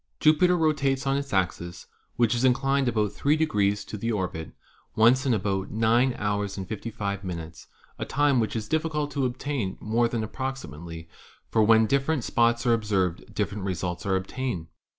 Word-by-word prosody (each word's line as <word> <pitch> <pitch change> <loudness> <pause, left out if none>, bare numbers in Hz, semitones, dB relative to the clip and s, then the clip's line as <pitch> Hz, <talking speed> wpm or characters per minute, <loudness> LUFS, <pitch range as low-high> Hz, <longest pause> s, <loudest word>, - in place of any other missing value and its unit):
Jupiter 180 +4 +4
rotates 140 -5 +1
on 135 0 +2
its 140 -1 -3
axis, 90 -2 -2 0.3
which 120 -1 +3
is 120 +1 -1
inclined 135 +1 +2
about 105 -4 +1
3 145 +7 +2
to 105 -9 0
the 115 +3 -1
orbit, 90 -6 -3 0.4
once 125 +5 +4
in 125 - +3
about 95 -2 -1
9 115 +4 +2
hours 105 -1 -2
and 95 -1 -5
55 100 -2 -4
minutes, 85 -3 -7
x - - -37 0.2
a - - -2
time 145 -2 +2
which 110 -1 -1
is 110 -1 -3
difficult 155 -1 -1
to 135 -2 0
obtain 125 -5 -3
more 115 +2 +1
than 115 -1 -2
approximately, 85 - -6 0.4
for 110 - +3
when 110 +1 +6
different 140 +3 +1
spots 120 +1 +2
are 120 - +4
observed 100 -6 -1
different 100 -1 -2
results 90 -2 -3
are 95 - +2
obtained. 95 -3 -3
115 Hz, 170 wpm, -26 LUFS, 100-135 Hz, 0.4 s, when